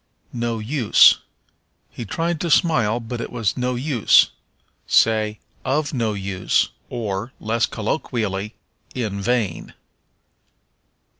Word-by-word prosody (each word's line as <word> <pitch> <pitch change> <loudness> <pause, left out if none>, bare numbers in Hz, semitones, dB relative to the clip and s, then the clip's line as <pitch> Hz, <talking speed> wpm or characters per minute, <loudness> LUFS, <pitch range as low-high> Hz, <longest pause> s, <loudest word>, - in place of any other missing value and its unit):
No 120 -1 -2
Use. 115 +1 +5 0.7
"He 120 - -7
tried 165 +8 -2
to 170 - -1
smile, 125 - +3
but 120 +1 -6
it - - -6
was 115 -6 -1
no 125 0 -1
use." 125 -3 +4 0.6
Say, 110 -1 +3 0.3
of 145 +2 -1
no 115 -5 0
use, 95 -2 0 0.2
or, 110 0 -4
less 115 +1 0
colloquially, 110 -3 -3 0.4
in 105 -6 -3
vain. 110 -5 -1
115 Hz, 105 wpm, -21 LUFS, 105-125 Hz, 0.7 s, Use